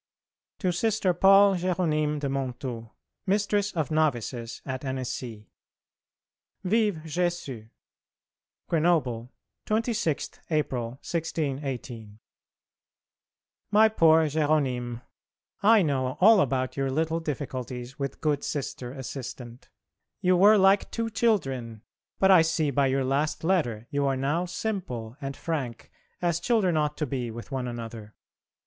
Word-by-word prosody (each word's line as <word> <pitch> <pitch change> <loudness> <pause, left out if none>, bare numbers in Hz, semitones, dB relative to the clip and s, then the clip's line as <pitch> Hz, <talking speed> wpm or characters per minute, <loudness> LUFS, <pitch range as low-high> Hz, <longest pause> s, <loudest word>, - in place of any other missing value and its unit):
To 185 -3 0
Sister 200 0 +1
Paul 195 +3 +6
Jéronyme 155 -4 0
de 140 - -1
Monthoux, 130 -4 -4 0.4
Mistress 205 +1 +1
of 160 -3 -2
Novices 125 -6 -1
at 130 0 -4
Annecy. 125 -5 -5 1.1
Vive 210 +1 +2
[+] 155 - -10
Jésus! 160 -9 -3 1.0
GRENOBLE, 150 -8 +1 0.4
26th 215 - -1
April, 130 -6 -1
1618. 135 -9 -4 1.5
MY 215 +2 +6
POOR 160 -6 +5
JÉRONYME, 140 -6 0 0.6
I 215 0 +6
know 130 -4 -1
all 210 +1 +7
about 130 -4 -1
your 135 -1 -1
little 160 +4 0
difficulties 130 -4 -5
with 140 -1 -4
good 150 -2 0
Sister 130 -4 -4
Assistant. 130 -2 -8 0.5
You 185 0 +3
were 205 +4 +7
like 195 +1 +4
two 230 -1 -3
children, 135 - 0 0.3
but 190 0 +4
I 185 -3 +8
see 160 -2 +1
by 140 +1 +2
your 135 0 +1
last 150 +4 0
letter 145 - 0
you 145 -1 +1
are 135 -1 +1
now 150 +7 0
simple 175 - -4
and 135 -1 -5
frank 135 -8 -4 0.3
as 170 -1 +1
children 195 -4 +2
ought 150 -1 0
to 155 - -1
be 125 -3 -3
with 115 +5 -9
one 130 -2 -2
another. 115 -3 -7
150 Hz, 120 wpm, -27 LUFS, 130-180 Hz, 1.5 s, I